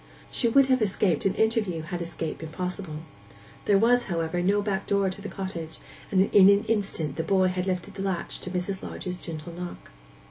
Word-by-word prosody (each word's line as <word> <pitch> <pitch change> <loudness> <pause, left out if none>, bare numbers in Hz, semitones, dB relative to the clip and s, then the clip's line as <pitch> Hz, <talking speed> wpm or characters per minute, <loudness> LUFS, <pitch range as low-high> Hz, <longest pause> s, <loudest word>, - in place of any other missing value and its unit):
She 240 - +2
would 275 +3 +6
have 260 -2 +2
escaped 195 -5 +2
an 195 - -1
interview, 220 -8 +1
had 175 +1 -4
escape 165 -1 -4
been 160 - -7
possible. 180 -2 -5 0.6
There 205 - +5
was, 240 +4 +4
however, 170 -1 -1
no 200 +3 +3
backdoor 200 -1 0
to 195 - -9
the 205 - -6
cottage, 170 -4 -5 0.3
and 190 - +4
in 195 -1 +8
an 200 +1 +5
instant 195 -10 -1
the 160 - 0
boy 185 +1 +3
had 180 0 -2
lifted 185 +1 -2
the 195 - -6
latch 190 -3 -2
to - - -6
Mrs. 185 +1 -2
Lodge's 180 -1 -5
gentle 165 -1 -7
knock. 175 - -8
185 Hz, 190 wpm, -27 LUFS, 170-200 Hz, 0.6 s, in